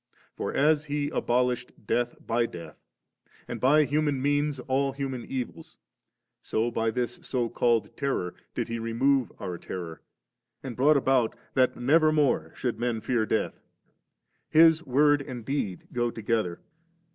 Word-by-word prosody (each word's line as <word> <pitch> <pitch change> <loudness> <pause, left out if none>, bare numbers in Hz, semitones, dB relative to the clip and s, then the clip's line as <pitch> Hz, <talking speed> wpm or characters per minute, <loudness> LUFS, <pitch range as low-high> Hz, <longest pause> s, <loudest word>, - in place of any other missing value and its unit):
For - - -3
as 150 +1 +3
He 145 -1 -2
abolished 125 -2 -1
death 120 +3 0
by 115 0 +1
death, 85 -5 -10 0.7
and - - -6
by 150 +4 +5
human 145 -1 0
means 145 +1 +1
all 135 +1 0
human 135 -3 -4
evils, 130 -2 -6 0.6
so 115 +2 -1
by 115 -1 0
this 120 0 -2
so 120 -3 -1
called 120 -1 +1
terror 135 -11 -2 0.2
did - - -1
He 115 0 -3
remove 125 +3 +1
our 90 -2 -5
terror, 85 -3 -7 0.6
and 130 -3 -6
brought 145 +4 +4
about 130 -4 +2 0.2
that 130 -1 +3
never 155 +5 +4
more 135 - +1
should 125 -2 -2
men 120 -2 -1
fear 115 -2 0
death. 110 - -1 0.9
EUs 160 0 +7
word 145 +2 +4
and 125 -5 -7
deed 110 -10 -3
go 120 -1 +1
together. 110 -6 -2
125 Hz, 145 wpm, -27 LUFS, 115-140 Hz, 0.9 s, EUs